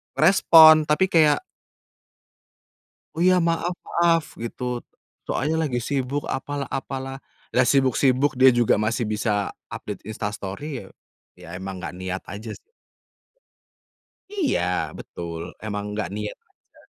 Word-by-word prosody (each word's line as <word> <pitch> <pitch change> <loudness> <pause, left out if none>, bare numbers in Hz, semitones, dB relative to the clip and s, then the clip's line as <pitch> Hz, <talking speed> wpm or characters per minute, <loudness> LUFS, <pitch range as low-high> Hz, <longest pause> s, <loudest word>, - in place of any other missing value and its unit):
Respon 160 -4 +7
tapi 170 +5 +2
kayak 155 -3 +4 1.7
"Oh 165 - -3
iya 185 0 +5
maaf 170 +1 0
maaf," 170 -1 +3 0.2
gitu, 125 +1 -4 0.4
soalnya 155 +3 0
lagi 125 -2 -2
sibuk 135 +3 -2
apalah 140 +1 -3
apalah, 135 -1 -5 0.4
lah 130 - +5
sibuk-sibuk 135 0 +2
dia 130 0 +8
juga 120 -2 +3
masih 110 +3 0
bisa 105 -1 -1 0.2
update - - -7
Insta 105 -1 -3
Story 120 +7 -6
ya, - - -13 0.5
ya 90 - -12
emang 95 0 -6
gak 85 -1 -6
niat 95 +1 -4
aja 105 +3 -7
s - - -8 1.8
Iya, 340 -8 +1 0.4
betul. 85 -1 -7 0.3
Emang 105 -1 -3 0.2
gak - - -1
niat 105 0 -5 0.3
aja. - - -25
130 Hz, 125 wpm, -23 LUFS, 105-150 Hz, 1.8 s, dia